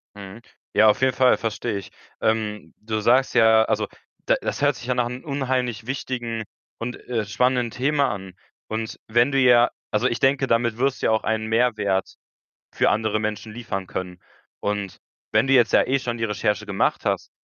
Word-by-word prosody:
Mhm. 100 Hz, +3 st, -10 dB, 0.3 s
Ja, 110 Hz, +1 st, +5 dB
auf 105 Hz, -, +1 dB
jeden 130 Hz, -1 st, +3 dB
Fall 130 Hz, -1 st, +4 dB
verstehe 110 Hz, -1 st, -3 dB
ich. 100 Hz, -, -9 dB, 0.3 s
Ähm, 110 Hz, -1 st, -1 dB
du 110 Hz, 0 st, -2 dB
sagst 125 Hz, +5 st, +3 dB
ja 110 Hz, -1 st, +6 dB
also, -, -, 0 dB, 0.4 s
da -, -, +3 dB
das -, -, -3 dB
hört 145 Hz, -2 st, +3 dB
sich 125 Hz, -, -10 dB
ja 125 Hz, -, +2 dB
nach 120 Hz, -1 st, +1 dB
'nem 125 Hz, +1 st, -7 dB
unheimlich 130 Hz, -5 st, -2 dB
wichtigen 120 Hz, -4 st, -3 dB, 0.4 s
und, 120 Hz, +1 st, -4 dB
äh, 115 Hz, -4 st, -1 dB
spannenden 125 Hz, +3 st, +1 dB
Thema 140 Hz, +3 st, +1 dB
an 95 Hz, -2 st, -7 dB, 0.3 s
und 110 Hz, 0 st, -4 dB
wenn 120 Hz, +5 st, +3 dB
du 135 Hz, -, +2 dB
ja 120 Hz, -2 st, +6 dB, 0.2 s
also, 105 Hz, -, +2 dB
ich 120 Hz, -, -2 dB
denke, 135 Hz, 0 st, +3 dB
damit 115 Hz, -2 st, +1 dB
wirst 135 Hz, +2 st, 0 dB
du -, -, +2 dB
ja -, -, +2 dB
auch 110 Hz, -, +1 dB
einen 110 Hz, 0 st, -1 dB
Mehrwert 110 Hz, -4 st, +1 dB, 0.6 s
für -, -, +3 dB
andere 110 Hz, 0 st, 0 dB
Menschen 110 Hz, 0 st, -4 dB
liefern 105 Hz, -5 st, -5 dB
können 90 Hz, -1 st, -6 dB, 0.4 s
und 100 Hz, -2 st, -3 dB, 0.3 s
wenn 110 Hz, +4 st, +3 dB
du 135 Hz, -, +2 dB
jetzt 120 Hz, -3 st, +4 dB
ja -, -, +6 dB
eh 135 Hz, +1 st, +2 dB
schon 120 Hz, -2 st, -4 dB
die 115 Hz, -, -1 dB
Recherche 105 Hz, 0 st, -1 dB
gemacht 100 Hz, -1 st, 0 dB
hast, -, -, -1 dB
115 Hz, 195 wpm, -23 LUFS, 105-125 Hz, 0.6 s, ja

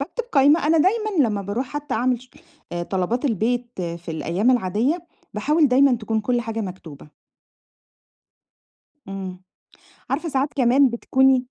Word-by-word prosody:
باكتب 440 Hz, -, -4 dB
قايمة. 290 Hz, +2 st, +4 dB
أنا 320 Hz, +1 st, +4 dB
دايمًا 390 Hz, -, +2 dB
لمّا 205 Hz, -2 st, -2 dB
باروح 210 Hz, +7 st, -3 dB
حتى 295 Hz, 0 st, -5 dB
أعمل 245 Hz, +1 st, 0 dB
شو 255 Hz, -, -19 dB, 0.4 s
آآ، 175 Hz, 0 st, -2 dB
طلبات 190 Hz, -, -2 dB
البيت 240 Hz, 0 st, 0 dB
في 170 Hz, -1 st, -5 dB
الأيام 170 Hz, +8 st, 0 dB
العادية، 250 Hz, -, 0 dB, 0.3 s
باحاول 295 Hz, +8 st, +2 dB
دايمًا 260 Hz, +1 st, +5 dB
تكون 220 Hz, -1 st, -2 dB
كل 240 Hz, +3 st, 0 dB
حاجة 225 Hz, -1 st, -4 dB
مكتوبة. 170 Hz, -7 st, -8 dB, 2.0 s
إمم، 190 Hz, -1 st, -7 dB, 0.7 s
عارفة 310 Hz, +6 st, -2 dB
ساعات 275 Hz, +1 st, -1 dB
كمان 265 Hz, +1 st, +4 dB
بتكوني 260 Hz, +2 st, +2 dB
245 Hz, 135 wpm, -22 LUFS, 200-280 Hz, 2.0 s, دايمًا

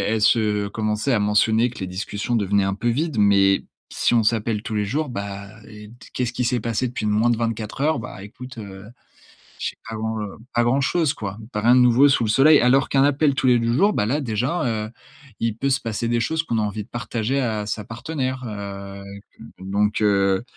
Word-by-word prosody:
elle 110 Hz, -, -1 dB
se 105 Hz, -2 st, +2 dB
commençait 110 Hz, +4 st, -1 dB
à 110 Hz, -, +2 dB
mentionner 110 Hz, +3 st, +2 dB
que -, -, -11 dB
les 95 Hz, -, -4 dB
discussions 100 Hz, +5 st, -3 dB
devenaient 100 Hz, -2 st, +2 dB
un 95 Hz, 0 st, -1 dB
peu 120 Hz, +4 st, -1 dB
vides, 145 Hz, +3 st, -1 dB
mais 100 Hz, -1 st, +4 dB, 0.3 s
si -, -, +1 dB
on 115 Hz, -, +4 dB
s'appelle 110 Hz, -1 st, 0 dB
tous 110 Hz, -, -4 dB
les 105 Hz, -, +1 dB
jours, 145 Hz, +8 st, -2 dB
bah, 100 Hz, -3 st, -6 dB, 0.2 s
et 105 Hz, -1 st, -11 dB
d -, -, -15 dB, 0.2 s
qu'est-ce 125 Hz, -2 st, -2 dB
qui 125 Hz, -, -1 dB
s'est 125 Hz, 0 st, +1 dB
passé 115 Hz, +2 st, -1 dB
depuis 120 Hz, -3 st, -4 dB
moins 105 Hz, +3 st, +2 dB
de 115 Hz, -, 0 dB
24 115 Hz, +1 st, -3 dB
heures? 155 Hz, -2 st, +2 dB
Bah, 115 Hz, -4 st, -8 dB
écoute, 125 Hz, +4 st, -11 dB
heu, 95 Hz, -2 st, -9 dB, 0.8 s
je -, -, -1 dB
sais -, -, -13 dB
pas, 115 Hz, -, -5 dB
heu, 110 Hz, -2 st, -4 dB, 0.2 s
pas 120 Hz, -, +3 dB
grand 125 Hz, +4 st, +2 dB
chose, 160 Hz, +1 st, +1 dB
quoi. 100 Hz, -1 st, -6 dB, 0.2 s
Tu 105 Hz, -, -1 dB
as -, -, -3 dB
rien 120 Hz, +3 st, +5 dB
de 125 Hz, -, +6 dB
nouveau 125 Hz, +3 st, +5 dB
sous 135 Hz, -4 st, +2 dB
le -, -, -2 dB
soleil. 145 Hz, +7 st, +6 dB
Alors 130 Hz, +3 st, +3 dB
qu'un 135 Hz, -1 st, +3 dB
appel 145 Hz, 0 st, +2 dB
tous 135 Hz, -, -1 dB
les 125 Hz, -1 st, +5 dB
2 115 Hz, 0 st, 0 dB
jours, 200 Hz, +10 st, +3 dB
bah, 105 Hz, -, 0 dB
là, 140 Hz, +6 st, 0 dB
déjà, 120 Hz, -1 st, -1 dB
heu, -, -, -8 dB, 0.5 s
il 115 Hz, -2 st, -1 dB
peut 140 Hz, -, 0 dB
se 135 Hz, 0 st, +2 dB
passer 115 Hz, 0 st, -3 dB
des 120 Hz, 0 st, +1 dB
choses 160 Hz, +8 st, 0 dB
qu'on 120 Hz, -8 st, -2 dB
a -, -, +1 dB
envie 105 Hz, 0 st, -3 dB
de 105 Hz, -, -22 dB
partager 120 Hz, +2 st, -2 dB
à 110 Hz, -5 st, -1 dB
sa 105 Hz, 0 st, -3 dB
partenaire 130 Hz, +2 st, -4 dB
heu 115 Hz, -, -5 dB, 0.5 s
avec 100 Hz, +1 st, -11 dB, 0.2 s
heu -, -, -10 dB
donc, 100 Hz, +3 st, 0 dB
heu, 100 Hz, -1 st, +2 dB
115 Hz, 235 wpm, -22 LUFS, 105-125 Hz, 0.8 s, de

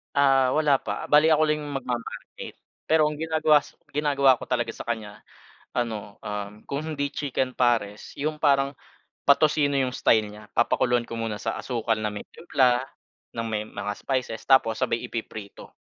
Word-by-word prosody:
Ah, 135 Hz, -2 st, +4 dB
wala 150 Hz, -3 st, +3 dB
pa, -, -, -5 dB
bale 150 Hz, +2 st, +6 dB
ako 155 Hz, -, +3 dB
lang 150 Hz, 0 st, +1 dB
yung 145 Hz, -1 st, -6 dB
magma-marinate. 120 Hz, -2 st, -6 dB, 0.3 s
Pero 160 Hz, -1 st, +4 dB
ang 150 Hz, -, -7 dB
ginagawa 155 Hz, -2 st, +4 dB
sa -, -, -15 dB, 0.2 s
ginagawa 140 Hz, -3 st, +3 dB
ko -, -, -7 dB
talaga 120 Hz, -2 st, 0 dB
sa -, -, -9 dB
kanya 110 Hz, -3 st, -4 dB, 0.5 s
ano, 110 Hz, -4 st, -3 dB
um, 105 Hz, 0 st, -6 dB
kung 140 Hz, +1 st, -3 dB
hindi 155 Hz, -2 st, -2 dB
chicken 130 Hz, -3 st, -2 dB
pares 115 Hz, -5 st, 0 dB
yung 150 Hz, +1 st, -2 dB
parang 140 Hz, -1 st, +3 dB, 0.5 s
patosino 145 Hz, 0 st, +4 dB
yung 130 Hz, -1 st, +1 dB
style 110 Hz, -2 st, +3 dB
niya 105 Hz, +1 st, -12 dB
papakuluan 120 Hz, 0 st, +2 dB
ko 115 Hz, -, -5 dB
muna 110 Hz, -2 st, -3 dB
sa 110 Hz, -, -2 dB
asukal 115 Hz, -3 st, -1 dB
na 105 Hz, -1 st, -2 dB
may 105 Hz, -, -6 dB
timpla, 130 Hz, -6 st, +2 dB, 0.5 s
ng 115 Hz, 0 st, -4 dB
may 110 Hz, -1 st, -2 dB
mga 105 Hz, -1 st, -5 dB
spices, 130 Hz, -4 st, -3 dB
tapos 130 Hz, -5 st, +4 dB
sabay 115 Hz, -, +1 dB
ipiprito. 110 Hz, -3 st, -7 dB
125 Hz, 165 wpm, -25 LUFS, 110-145 Hz, 0.5 s, bale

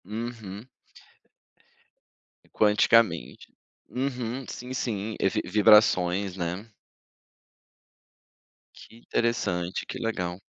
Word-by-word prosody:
Uhum. 110 Hz, -1 st, -6 dB, 1.9 s
Quanticamente. 105 Hz, -, +3 dB, 0.4 s
Uhum. 125 Hz, -1 st, -3 dB
Sim, 125 Hz, +1 st, -7 dB
sim, 110 Hz, -4 st, -3 dB
eh, 95 Hz, -, +3 dB
vi -, -, -1 dB
vibrações, 100 Hz, -2 st, +4 dB
né. 90 Hz, +3 st, -3 dB, 2.1 s
Que -, -, -15 dB
interessante, 95 Hz, -7 st, -1 dB
que -, -, -6 dB
legal. 90 Hz, -5 st, -3 dB
105 Hz, 75 wpm, -27 LUFS, 95-115 Hz, 2.1 s, vibrações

